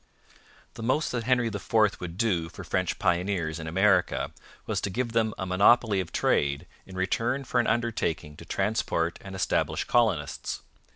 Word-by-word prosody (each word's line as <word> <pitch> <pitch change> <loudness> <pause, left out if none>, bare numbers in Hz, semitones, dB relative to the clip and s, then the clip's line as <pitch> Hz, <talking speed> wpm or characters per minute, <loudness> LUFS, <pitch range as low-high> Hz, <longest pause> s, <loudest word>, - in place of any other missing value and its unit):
The - - -9
most 130 +7 +1
that 120 -2 -2
Henry 125 -1 +3
IV - - -8 0.3
would 90 -1 -6
do 90 -7 +1
for - - -9
French - - -1
pioneers 85 -2 0
in 80 - -6
America 95 +2 +2 0.3
was - - -1
to - - -2
give 120 +5 -2
them 110 -2 +1
a 95 - -3
monopoly 100 +3 +4
of 90 -3 -4
trade 70 +3 +1 0.2
in 95 - -10
return 115 +8 0
for 125 -1 0
an 120 - +2
undertaking 105 -10 -1
to - - -11
transport 95 -5 -1
and 95 -1 -8
establish 95 - 0
colonists. 105 -12 0
95 Hz, 165 wpm, -27 LUFS, 85-115 Hz, 0.3 s, monopoly